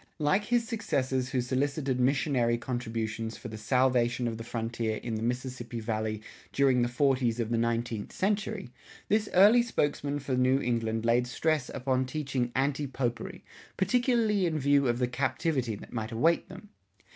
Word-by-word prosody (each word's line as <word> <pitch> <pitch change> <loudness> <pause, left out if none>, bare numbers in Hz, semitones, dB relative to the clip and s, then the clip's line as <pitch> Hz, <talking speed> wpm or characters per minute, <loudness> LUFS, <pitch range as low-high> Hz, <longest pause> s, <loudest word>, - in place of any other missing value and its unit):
Like 185 +7 +1
his 240 -1 +1
successors 130 - -1
who 130 - 0
solicited 135 +1 -1
missionary 125 -3 +2
contributions 115 -2 -3
for 120 - -8
the 110 - -7
salvation 125 +1 +2
of 115 -1 -4
the - - -5
frontier 115 -1 -2
in 115 - -5
the 110 - -2
Mississippi 125 0 -3
Valley 110 -1 -2 0.3
during 135 -3 +3
the 120 - +2
forties 125 -2 +1
of 115 -1 -2
the 115 - +2
nineteenth 115 -2 -1
century, 195 - -2 0.4
this 210 0 +2
early 210 +6 +7
spokesman 145 -10 -1
for 140 -2 -4
New 130 +1 +3
England 115 -3 -1
laid 120 +1 +3
stress 155 +1 0
upon 130 0 0
teaching 130 -3 -2
anti 140 +2 0
popery, 125 -3 -4 0.3
particularly 220 -2 +2
in 160 -2 -1
view 140 -1 +3
of 120 0 +1
the 125 0 +1
captivity 130 -1 -1
that 100 - -12
might 110 -1 -3
await 160 +9 +2
them. 185 +3 -11
130 Hz, 160 wpm, -29 LUFS, 120-145 Hz, 0.4 s, early